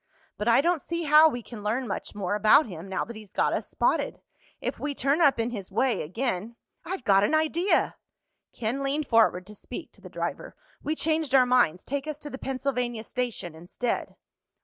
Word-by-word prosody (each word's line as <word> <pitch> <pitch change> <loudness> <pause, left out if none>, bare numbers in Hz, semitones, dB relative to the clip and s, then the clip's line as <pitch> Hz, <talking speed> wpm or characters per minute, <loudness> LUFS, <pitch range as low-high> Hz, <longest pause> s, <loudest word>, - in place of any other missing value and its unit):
But 210 - -4
I 235 +3 +6
don't 340 0 +1
see 340 0 -3
how 305 +1 +7
we 245 -5 -5
can 225 -2 -9
learn 230 +5 -1
much - - -5
more 200 -2 -2
about 215 +9 +5
him, 180 -4 -8
now 190 - -1
that 235 - -9
he's 215 -2 -11
got - - +1
us - - -2
spotted. - - 0 0.4
If - - -4
we 290 -1 -3
turn 280 +6 +1
up 280 -6 +4
in 230 +1 0
his 200 -5 -6
way 230 +1 +1
again—" 220 - -3 0.3
"I've 360 -6 -5
got 195 -2 +4
an 300 - +2
idea!" 320 +5 +1 0.5
Ken 240 +4 -3
leaned 280 +2 0
forward 225 -7 +3
to 210 - -11
speak 210 - -9
to - - -22
the - - -11
driver. - - -5 0.3
"We 310 - -2
changed 315 -4 0
our 255 -1 +7
minds. 245 -9 +3
Take 280 +2 -4
us 305 -1 -4
to 295 -1 -8
the 265 - -7
Pennsylvania 250 -4 -2
Station 240 -9 -4
instead." 175 +9 -4
245 Hz, 200 wpm, -27 LUFS, 210-290 Hz, 0.5 s, how